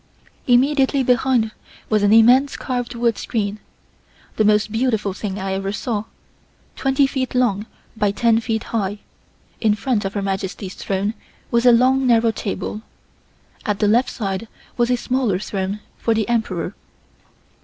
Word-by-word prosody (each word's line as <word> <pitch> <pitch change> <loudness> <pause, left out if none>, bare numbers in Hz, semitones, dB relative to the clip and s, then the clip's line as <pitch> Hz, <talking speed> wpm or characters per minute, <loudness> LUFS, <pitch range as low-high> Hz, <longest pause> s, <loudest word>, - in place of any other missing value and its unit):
Immediately 270 +2 +3
behind 245 -2 +2 0.4
was 215 -1 +2
an 205 0 +3
immense 245 +5 +5
carved 245 -2 -3
wood 235 -2 0
screen, 210 -2 -2 0.8
the 215 - +2
most 210 0 +3
beautiful 225 -4 0
thing 200 0 -5
I 190 -1 -3
ever 195 0 -2
saw, 210 0 -3 0.7
twenty 270 0 +2
feet 265 -1 -2
long 220 -4 +1 0.3
by 210 -2 +1
ten 225 +2 +2
feet 225 -1 -2
high. 205 -2 -1 0.6
In 215 -2 +3
front 225 0 -1
of 195 +1 -4
Her 200 - -1
Majesty's 190 0 -3
throne 200 +2 -2 0.4
was 235 +1 +3
a - - +9
long 260 +2 +4
narrow 230 -1 +4
table. 210 0 -4 0.8
At 210 -1 -1
the 210 - +2
left 240 +4 +3
side 195 -1 -4 0.3
was 240 0 +1
a 250 - +2
smaller 245 -6 0
throne 195 +1 -3 0.2
for 230 - +1
the 220 -2 0
Emperor. 205 -6 -1
225 Hz, 150 wpm, -21 LUFS, 205-245 Hz, 0.8 s, a